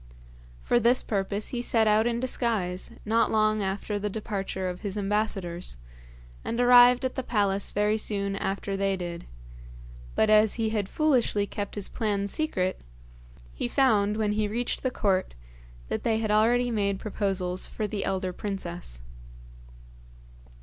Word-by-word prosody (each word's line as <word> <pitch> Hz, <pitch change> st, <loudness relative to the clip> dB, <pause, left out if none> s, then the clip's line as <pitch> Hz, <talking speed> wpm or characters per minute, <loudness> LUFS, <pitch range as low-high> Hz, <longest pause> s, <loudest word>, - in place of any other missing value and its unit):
For 240 Hz, -, +3 dB
this 240 Hz, +2 st, +3 dB
purpose 200 Hz, 0 st, -2 dB
he 245 Hz, -, -3 dB
set 225 Hz, -2 st, +2 dB
out 215 Hz, +2 st, +4 dB
in 235 Hz, 0 st, 0 dB
disguise 220 Hz, -8 st, -1 dB, 0.2 s
not 225 Hz, +1 st, +2 dB
long 215 Hz, -1 st, +2 dB
after 200 Hz, +2 st, -2 dB
the 210 Hz, +1 st, -2 dB
departure 195 Hz, -3 st, -3 dB
of 180 Hz, 0 st, -5 dB
his 205 Hz, -1 st, -4 dB
ambassadors, 195 Hz, -, -2 dB, 0.7 s
and 230 Hz, -, -3 dB
arrived 245 Hz, +1 st, +7 dB
at 260 Hz, -, -1 dB
the -, -, -2 dB
palace 200 Hz, -5 st, 0 dB
very 210 Hz, +1 st, +1 dB
soon 200 Hz, -2 st, -1 dB
after 195 Hz, 0 st, -2 dB
they 195 Hz, 0 st, 0 dB
did; 175 Hz, -1 st, -6 dB, 0.9 s
but 220 Hz, -, +3 dB
as 215 Hz, 0 st, +5 dB
he 225 Hz, -1 st, 0 dB
had 205 Hz, -3 st, -1 dB
foolishly 255 Hz, -9 st, +2 dB
kept 205 Hz, 0 st, -5 dB
his 205 Hz, -2 st, -4 dB
plan 205 Hz, -3 st, -1 dB
secret, 190 Hz, -8 st, -1 dB, 0.7 s
he -, -, -2 dB
found, 210 Hz, -, +2 dB
when 215 Hz, -1 st, +1 dB
he 210 Hz, 0 st, 0 dB
reached 235 Hz, +4 st, -2 dB
the 260 Hz, -, 0 dB
court, 190 Hz, -, 0 dB, 0.5 s
that -, -, -2 dB
they 225 Hz, -2 st, +1 dB
had 220 Hz, -1 st, -1 dB
already 240 Hz, +3 st, +3 dB
made 200 Hz, -3 st, 0 dB
proposals 190 Hz, -3 st, -2 dB
for 215 Hz, -, -4 dB
the 205 Hz, -1 st, -3 dB
elder 185 Hz, -1 st, -2 dB
princess. 175 Hz, -, -6 dB
210 Hz, 150 wpm, -27 LUFS, 195-225 Hz, 0.9 s, arrived